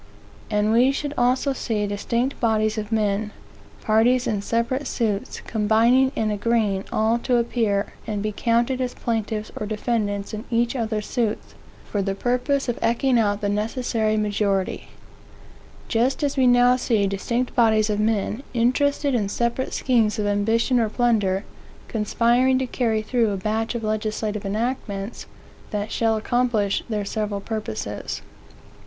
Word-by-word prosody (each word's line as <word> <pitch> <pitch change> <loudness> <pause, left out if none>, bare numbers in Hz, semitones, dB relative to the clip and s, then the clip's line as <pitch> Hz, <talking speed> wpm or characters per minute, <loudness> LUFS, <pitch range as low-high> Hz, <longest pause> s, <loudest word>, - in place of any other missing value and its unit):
And 210 +1 +1
we 245 +4 +5
should 285 +1 -3
also 255 +2 +2
see 220 -5 -2
distinct 235 +6 -2
bodies 220 -1 +1
of 210 +1 -6
men, 210 -1 0 0.5
parties 235 +3 +3
in 205 -2 -1
separate 235 +6 -1
suits, 215 -4 -2
combining 230 +5 +3
and 215 -1 0
agreeing 210 -2 0
all 225 +2 +2
to 245 0 +1
appear 225 -4 0
and 210 -2 -2
be 215 - -1
counted 235 +4 +1
as 250 -1 -2
plaintiffs 220 -2 -2
or 210 - -4
defendants 210 -2 -2
in 215 +2 -5
each 235 +1 +1
other's 220 -3 -2
suits, 230 -4 -2 0.3
for 205 - -2
the 195 0 -1
purpose 250 +6 0
of 240 - -2
ekeing 240 +2 +2
out 205 -2 +1
the 205 - 0
necessary 215 +1 0
majority; 205 -2 -1 1.0
just 250 +6 +1
as 285 -1 0
we 260 -2 +3
now 245 0 +5
see 225 -5 +1
distinct 235 +6 -2
bodies 220 -3 +3
of 205 - -1
men, 215 +2 0
interested 280 +4 +2
in 210 -5 0
separate 235 +4 -1
schemes 230 -5 +1
of 210 - -1
ambition 225 +5 +2
or 225 -2 +1
plunder, 210 -5 +1 0.4
conspiring 240 +4 +2
to 260 - 0
carry 230 -3 0
through 230 0 +1
a 200 - -2
batch 220 +4 -2
of 235 - -3
legislative 215 -1 -2
enactments, 210 -1 -3 0.4
that 210 0 -3
shall 225 -1 +1
accomplish 225 -3 0
their 210 -2 -2
several 210 -1 -2
purposes. 215 +1 -5
225 Hz, 150 wpm, -23 LUFS, 210-245 Hz, 1.0 s, we